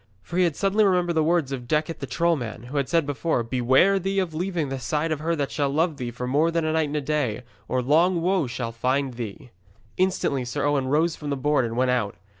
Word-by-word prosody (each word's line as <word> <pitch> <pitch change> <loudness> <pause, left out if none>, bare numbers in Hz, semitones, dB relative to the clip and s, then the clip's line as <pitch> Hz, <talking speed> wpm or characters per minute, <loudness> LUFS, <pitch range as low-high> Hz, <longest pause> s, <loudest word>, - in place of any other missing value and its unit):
For 175 - -5
he 185 - +5
had 165 -4 0
suddenly 200 +2 +2
remembered 180 -3 +2
the 160 -1 +2
words 160 -4 +1
of 125 -3 -5
Decet 155 +3 0
the - - -5
troll 170 0 +2
man, 115 -5 -6
who 130 +4 -5
had 140 -3 0
said, 165 -1 +2 0.5
'Beware 130 +10 +4
thee 195 +2 -2
of 185 -4 0
leaving 170 -3 -2
the 135 0 -3
side 150 +6 -1
of 155 - -1
her 165 +2 0
that 140 -5 -2
shall 140 +4 0
love 155 +2 0
thee 125 -3 -4
for 125 +1 -5
more 145 +6 +2
than 165 -1 0
a 155 - 0
night 160 -1 +1
and 150 +1 -3
a - - -1
day, 135 -6 -1 0.2
or 130 0 0
long 170 +7 +3
woe 180 -5 +1
shall 120 -1 -4
find 130 +3 -1
thee.' 120 +2 -7 0.5
Instantly 185 -8 +1
Sir 130 +4 -2
Owen 145 -2 +1
rose 155 +4 +2
from 150 - -6
the 140 - -1
board 145 -1 +2
and 115 0 -4
went 130 0 +2
out. 110 -5 0
145 Hz, 245 wpm, -24 LUFS, 130-170 Hz, 0.5 s, he